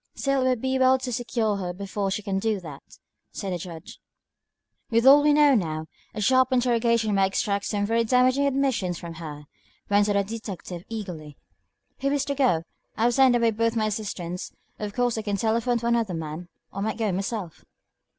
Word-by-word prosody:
"Still, 275 -1 0
it 260 - +2
would 250 -3 0
be 260 0 0
well 260 0 +5
to 255 -1 -5
secure 230 -3 -1
her 180 -2 -4
before 200 +1 -3
she 200 +2 -3
can 195 -2 -1
do 215 0 0
that," 150 -5 -9 0.5
said 195 -3 -4
the 175 - -3
Judge. 165 -1 -9 0.9
"With 230 +1 +2
all 280 +2 +9
we 295 0 +4
know 295 -1 +5
now, 160 -8 -1 0.3
a 215 - -3
sharp 260 +4 +3
interrogation 235 -3 +2
might 195 -1 +3
extract 200 0 -1
some 205 -1 -1
very 230 +2 +1
damaging 255 +4 +3
admissions 260 -10 0
from 170 -1 -8
her," 150 -2 -7 0.5
went 205 +1 +4
on 205 - +1
the 200 - +3
detective, 195 -5 -7
eagerly. 175 -10 -7 0.6
"Who 275 - 0
is 285 -1 0
to 280 - -1
go? 250 - +2 0.3
I 220 - 0
have 240 +1 +3
sent 260 -1 +5
away 235 -1 +3
both 230 +1 0
my 220 -1 +1
assistants. 195 -4 -4 0.3
Of 210 -1 -5
course 245 -2 +1
I - - -2
can 205 -1 -2
telephone 230 +3 +1
for 235 0 -3
another 230 -6 +1
man, 160 +2 -6 0.2
or - - -6
I - - -2
might 220 +1 -2
go 220 -3 0
myself." 195 -2 -4
220 Hz, 200 wpm, -25 LUFS, 190-245 Hz, 0.9 s, all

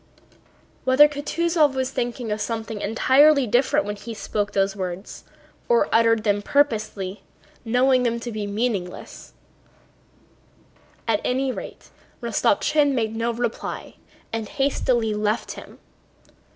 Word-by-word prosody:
Whether 260 +3 +6
Kutúzov 300 0 +1
was 260 -1 -1
thinking 240 -2 -3
of 210 0 -2
something 225 -1 -4
entirely 270 +6 +4
different 265 +6 +2
when 205 0 -4
he 225 +3 -8
spoke 205 -1 -3
those 195 0 +1
words, 185 0 -6 0.4
or 475 0 +3
uttered 225 -1 +4
them 205 -1 +1
purposely, 215 -8 0 0.4
knowing 250 +2 +3
them 235 -1 0
to 240 - -5
be 215 -2 -4
meaningless, 205 -4 -4 1.7
at 220 -2 +1
any 260 +1 0
rate - - -9 0.3
Rostopchín 290 -2 +2
made 225 -3 -1
no 230 +1 -1
reply 235 0 -4 0.4
and 225 -2 -3
hastily 255 -5 0
left 210 +1 -1
him. - - -11
230 Hz, 120 wpm, -23 LUFS, 210-265 Hz, 1.7 s, Whether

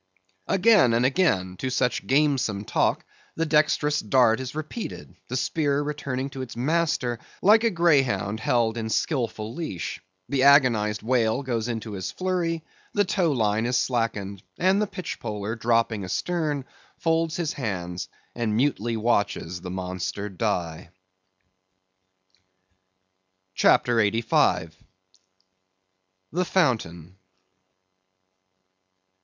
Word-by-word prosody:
Again 195 - +4
and 120 +2 +2
again 95 - +1
to 130 - -3
such 125 0 0
gamesome 135 -8 +1
talk, - - 0 0.3
the 165 - 0
dexterous 150 -1 +2
dart 115 +1 +3
is 130 +1 -6
repeated, 155 +9 -6
the 125 - -2
spear 145 0 0
returning 140 -2 -4
to 135 - -6
its 130 -3 -7
master 135 -3 0 0.2
like 215 +3 +6
a 230 - +4
greyhound 135 - +2
held 120 -2 +1
in 110 0 -3
skilful 115 -4 -1
leash. 155 - -5 0.3
The 135 -2 0
agonized 120 -7 +4
whale 120 +1 +1
goes 120 -3 -2
into 115 -2 -4
his 95 -3 -4
flurry; 175 -3 -2 0.3
the 205 -1 +3
tow 180 -4 +1
line 110 -3 +1
is 125 - +1
slackened, 105 -6 -1 0.2
and 190 +3 +3
the 210 - 0
pitchpoler 110 - -5
dropping 115 -2 +1
astern, 150 - -2 0.3
folds 165 0 0
his 170 -4 -2
hands, 90 -8 -4 0.3
and 110 -3 -1
mutely 120 -4 0
watches 100 -6 -1
the 90 - -7
monster 95 +2 -4
die. 90 -5 -3 2.6
CHAPTER 120 +4 +3
85. 100 -6 +2 1.6
The 180 +3 0
Fountain. 95 - 0
120 Hz, 115 wpm, -25 LUFS, 105-150 Hz, 2.6 s, like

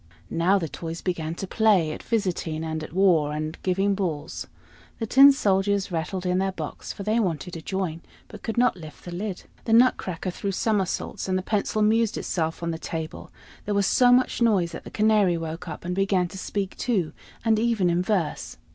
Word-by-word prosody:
Now 175 +4 +3
the 170 -4 -2
toys 165 +3 -6
began 165 -3 -3
to 195 - -4
play 195 -6 +3
at - - -6
"visiting," 175 -7 -1
and 160 -1 -3
at - - -8
"war," 170 -5 +3
and 155 +1 -3
"giving 195 +2 +1
balls." 170 -5 -3 0.5
The 225 - -2
tin 275 +5 +8
soldiers 200 -5 +1
rattled 180 +3 -3
in 180 0 +1
their 195 0 0
box, 155 -4 -6
for 200 - -7
they 215 +3 +1
wanted 180 -4 -2
to 165 - -6
join, 175 -2 -3 0.3
but - - -11
could 225 - -4
not 250 -3 +4
lift 155 -4 -12
the 175 - -6
lid. 190 +1 -4 0.2
The 225 - +1
nutcracker 195 -7 +3
threw 195 +2 -3
somersaults, 195 -2 -1
and 185 - +2
the 185 - -3
pencil 215 +1 0
amused 220 +1 +2
itself 165 -1 -2
on 170 - -1
the 160 - -5
table: 160 -1 -5 0.4
there 205 - -1
was 200 -1 +3
so 245 +4 +5
much 250 0 +3
noise 195 -7 +3
that 165 - -8
the - - -7
canary 210 -5 +3
woke 165 +2 -5
up, 170 - -7
and 180 - -2
began 195 -1 +1
to 190 - -9
speak 195 0 -3
too, 195 -10 0 0.3
and 220 -1 +3
even 225 -5 +2
in 175 +1 +2
verse. 180 -5 -2
185 Hz, 200 wpm, -25 LUFS, 165-210 Hz, 0.5 s, tin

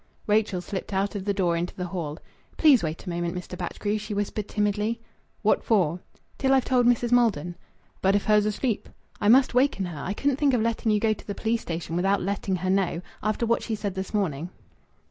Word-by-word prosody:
Rachel 210 -3 +1
slipped 195 +2 -5
out 195 +1 0
of 200 -2 -5
the 205 - +1
door 175 -4 +1
into 170 +1 -3
the 180 - -3
hall. 170 -4 -4 0.4
"Please 285 -8 +6
wait 160 +2 -4
a - - -4
moment, 170 +1 -2
Mr. 180 0 -6
Batchgrew," 205 +4 -2
she 210 0 -5
whispered 205 0 -2
timidly. 210 +2 0 0.4
"What 215 - +3
for?" 180 -6 +2 0.4
"Till 270 0 +3
I've 265 - +2
told 250 -2 +3
Mrs. 240 0 +2
Maldon." 200 -9 +2 0.5
"But 195 +1 +3
if 205 - +1
her's 210 -1 +4
asleep?" 215 +1 -2 0.3
"I 205 - 0
must 260 +2 +6
waken 250 -6 +2
her. 170 -4 -6
I 190 - -2
couldn't 280 +2 +1
think 280 -3 +3
of 235 - +1
letting 230 -1 0
you 210 - +3
go 220 0 +2
to - - -13
the 200 - -4
police 225 0 0
station 165 -1 -4
without 195 +3 +2
letting 195 0 -1
her 185 +1 -2
know 190 -2 0 0.2
after 215 +3 0
what 235 0 +1
she 225 - -2
said 205 -2 -3
this 190 0 -5
morning." 175 -6 -1
205 Hz, 215 wpm, -26 LUFS, 180-225 Hz, 0.5 s, Please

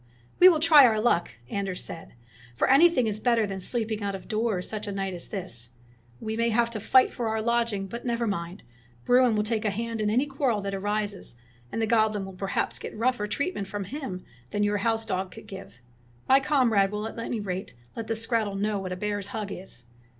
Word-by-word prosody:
''We 365 - +11
will 325 -4 +3
try 310 -2 +8
our 220 -2 +1
luck," 215 -6 +2 0.2
Anders 195 +3 -3
said; 160 - -8 0.4
"for - - +1
anything 275 -2 +5
is 215 -1 -2
better 230 -1 +2
than 195 -1 -5
sleeping 220 +1 -2
out 200 -1 -2
of 190 - -9
doors 215 -4 -1
such 215 -1 -5
a - - -2
night 195 -1 -3
as 175 - -6
this. 175 - -4 0.5
We 220 0 -4
may 230 +1 +1
have 235 +1 +2
to 220 - -4
fight 255 +5 +4
for 235 - -2
our 220 0 0
lodging, 230 -3 0
but 235 +5 -7
never 235 -1 -1
mind 180 -3 -4 0.2
— 120 0 -30
Bruin 245 -2 +5
will 210 - +1
take 220 0 -1
a 215 - +1
hand 225 +2 -3
in 210 - +1
any 245 +6 +2
quarrel 270 -6 0
that 200 0 -4
arises, 205 - -2 0.4
and - - -3
the 225 - +2
goblin 215 -3 +2
will 190 - -9
perhaps 195 +1 -2
get - - -7
rougher 230 -2 +1
treatment 280 - -2
from 205 +1 -4
him 200 -5 -6 0.2
than 205 - 0
your 205 0 +1
house 225 +1 0
dog 190 -3 -2
could - - -11
give. 195 -7 -10 0.5
My 265 +1 +6
comrade 245 -9 +3
will 210 +1 -3
at 225 - -8
any 230 0 -3
rate 190 -6 -5 0.2
let 230 - -5
the 225 - -1
skrattel 225 -2 0
know 205 0 0
what 185 -1 -5
a - - -2
bear's 205 +1 -2
hug 205 0 -5
is." 180 -10 -6
215 Hz, 220 wpm, -27 LUFS, 195-235 Hz, 0.5 s, We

